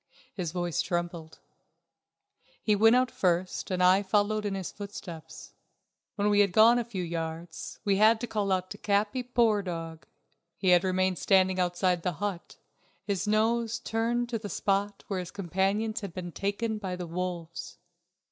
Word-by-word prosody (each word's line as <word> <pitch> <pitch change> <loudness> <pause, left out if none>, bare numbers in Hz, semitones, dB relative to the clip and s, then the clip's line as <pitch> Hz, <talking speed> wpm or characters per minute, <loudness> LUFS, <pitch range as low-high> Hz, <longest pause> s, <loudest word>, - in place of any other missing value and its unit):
His 175 -5 -3
voice 175 -1 -1
trembled. 175 -2 -4 1.3
He 210 - +3
went 225 +3 +6
out 255 -1 +2
first, 180 0 0
and 185 -1 0
I 185 +2 +6
followed 210 +1 +1
in 195 - -2
his 190 -2 -4
footsteps. 170 - -9 0.6
When 205 +1 +1
we 205 - +4
had 200 -3 +4
gone 230 +4 +6
a - - 0
few 210 -6 -5
yards 165 0 -5
we 200 -1 +3
had 220 +2 +5
to - - -1
call 200 -5 0
to 185 - -10
Capi. 205 +5 +1
Poor 235 -4 +2
dog, 165 -3 -6 0.5
he 190 - +1
had 180 0 +6
remained 185 -1 +1
standing 190 -1 +3
outside 180 0 +1
the 180 +1 -1
hut, 195 +1 -5 0.5
his 200 0 -2
nose 225 +2 +1
turned 235 +1 -1
to 230 -2 -2
the 205 -1 -6
spot 200 +2 -1
where 195 -2 -2
his 180 -1 -5
companions 200 +4 -1
had 195 -5 -7
been 175 -1 -5
taken 210 +4 -2
by 190 -3 -4
the 180 0 -5
wolves. 170 -1 -5
195 Hz, 165 wpm, -28 LUFS, 175-215 Hz, 1.3 s, went